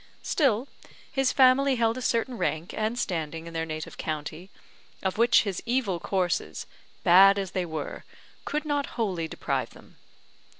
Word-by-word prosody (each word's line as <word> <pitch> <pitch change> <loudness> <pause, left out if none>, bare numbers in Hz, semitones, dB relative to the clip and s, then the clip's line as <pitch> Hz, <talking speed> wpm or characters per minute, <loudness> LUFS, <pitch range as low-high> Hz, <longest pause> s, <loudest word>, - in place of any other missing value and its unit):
Still, 265 -4 +1 0.4
his 270 -1 +1
family 265 0 +5
held 230 -1 +1
a 255 - -5
certain 245 +1 0
rank 165 -5 -2
and 220 +2 -1
standing 165 -6 -3
in 170 - -9
their 165 0 -2
native 155 0 -6
county, 155 +3 -5 0.5
of 190 +3 -2
which 235 0 +5
his 200 -4 -3
evil 235 -7 0
courses, 180 0 -1 0.4
bad 195 +3 +7
as 195 -2 -3
they 185 -2 -2
were, 155 -3 -5 0.4
could 300 +1 -3
not 290 -2 0
wholly 185 -8 -1
deprive - - -2
them. - - -17
200 Hz, 155 wpm, -27 LUFS, 170-245 Hz, 0.5 s, bad